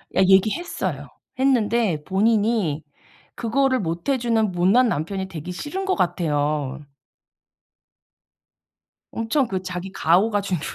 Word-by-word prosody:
야 190 - +4
얘기했어요. 210 - +1 0.3
했는데 230 - +2
본인이 205 -5 +1 0.5
그거를 260 +3 +1
못 170 +3 -3
해 275 - +3
주는 225 -4 +1
못난 190 +8 +3
남편이 190 +3 -3
되기 170 +1 -7
싫은 295 - -5
것 380 -1 +1
같아요. 150 -5 -1 2.3
엄청 230 +4 0
그 190 -3 -3
자기 185 0 -6
가오가 200 +5 +2
주는 185 -5 -2
195 Hz, 235 characters per minute, -22 LUFS, 175-235 Hz, 2.3 s, 야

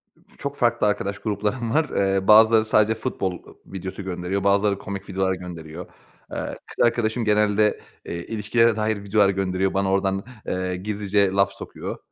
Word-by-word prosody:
Ç - - -26
çok 140 0 -4
farklı 120 -4 +2
arkadaş 100 -1 -1
gruplarım 105 +3 -2
var. 155 -1 +2
Eee, 95 -1 0
bazıları 110 +1 +7
sadece 110 0 +3
futbol, 110 -5 -2 0.2
ııı, - - -15
videosu 95 0 -7
gönderiyor. 95 +1 -3
Bazıları 100 0 +3
komik 100 -1 -7
videolar 95 0 0
gönderiyor. 85 -2 -8 0.5
Eee, - - -5 0.3
kız - - +1
arkadaşım 115 0 0
genelde, 105 0 +2 0.3
eee, 85 0 -5
ilişkilere 115 +1 +2
dair 110 0 0
videolar 100 0 +3
gönderiyor. 95 0 0
Bana 95 0 +1
oradan, 95 0 0 0.2
eee, 90 0 -2
gizlice 100 0 0
laf 100 0 +2
sokuyor. 100 - -7
100 Hz, 160 wpm, -23 LUFS, 95-110 Hz, 0.5 s, bazıları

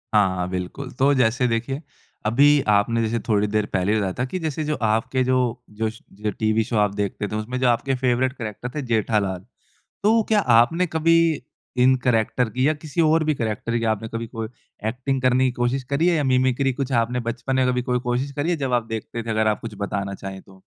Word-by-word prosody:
हाँ, 95 -3 +2
बिल्कुल, 95 +9 -5
तो 135 +2 +3
जैसे 125 0 +2
देखिए, 120 +5 -2 0.4
अभी 140 +6 +5
आपने 105 +3 +3
जैसे 115 +1 0
थोड़ी 105 -1 +2
देर 105 0 0
पहले 95 +2 +1
ही - - +2
बताया 95 -3 -1
था 125 - +1
कि 185 +8 -4
जैसे 155 -1 -2
जो 150 0 -1
आपके 115 +4 +1
जो 130 0 +2 0.3
जो 110 +1 -2
श 110 - -12
जो 105 +1 -3
टीवी 110 0 +2
शो 115 -1 -2
आप 105 -1 +2
देखते 100 0 -2
थे। 105 - -5
उसमें 120 +4 -3
जो 130 - +2
आपके 130 +3 +1
फेवरेट 130 0 +1
कैरेक्टर 110 +1 -5
थे 150 - -1
जेठालाल, 105 -5 0 0.6
तो 220 +2 +4
क्या 215 -2 +4
आपने 125 +8 +4
कभी 165 +1 +3 0.7
इन 130 +1 +6
कैरेक्टर 120 0 +2
की 130 +6 +1
या 155 - +2
किसी 150 +1 -4
और 160 0 +4
भी 155 -1 +1
कैरेक्टर 115 0 -2
की 115 - -2
आपने 110 +1 -5
कभी 115 0 -4
कोई 115 -2 -5 0.4
एक्टिंग 130 +3 -2
करने 130 +1 +3
की 125 - 0
कोशिश 125 +2 -1
करी 160 +5 +2
है, 170 - +3
या 145 - 0
मिमिक्री 130 +1 +2
कुछ 135 +1 -3
आपने 120 +1 +1
बचपन 120 +3 -3
में 130 -1 +3
कभी 125 0 +1
कोई 125 0 0
कोशिश 125 +3 -2
करी 145 +5 -1
है 170 - +1
जब 135 -3 -2
आप 120 -2 +1
देखते 115 +1 -5
थे 115 - -5
अगर 110 0 +1
आप 105 - 0
कुछ 115 -2 -7
बताना 100 -1 -2
चाहें 95 0 -7
तो? 95 -1 -19
120 Hz, 225 wpm, -23 LUFS, 110-135 Hz, 0.7 s, इन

